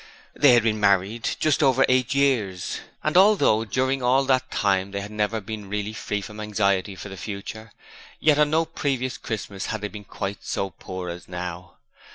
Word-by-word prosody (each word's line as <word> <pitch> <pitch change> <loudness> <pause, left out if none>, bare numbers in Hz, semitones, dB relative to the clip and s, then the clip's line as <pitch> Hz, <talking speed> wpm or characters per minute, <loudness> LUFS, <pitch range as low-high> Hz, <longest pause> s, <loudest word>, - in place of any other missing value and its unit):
They 145 -4 +6
had 120 - +4
been 110 -1 +1
married 100 +3 +2
just 155 0 +2
over 135 -2 +4
eight 130 +1 +2
years, 110 -11 +1 0.2
and 155 - 0
although 180 - +5
during 130 +4 0
all 130 +2 +3
that 130 -1 +1
time 95 -1 +1
they 100 0 -4
had 100 +1 -7
never 105 +1 -1
been 105 -1 -7
really 105 +1 -3
free 105 -1 -3
from 105 +1 -9
anxiety 100 -2 0
for 95 - -8
the 95 - -8
future, 105 +3 -7 0.5
yet 150 -1 +4
on 150 -1 +4
no 160 +2 +2
previous 135 -5 -2
Christmas 100 -3 -5
had 110 - -3
they 105 - -3
been 105 0 -9
quite 100 +1 -5
so 95 -1 -2
poor 90 +1 -7
as 85 0 -9
now. 90 0 -6
105 Hz, 190 wpm, -24 LUFS, 100-130 Hz, 0.5 s, They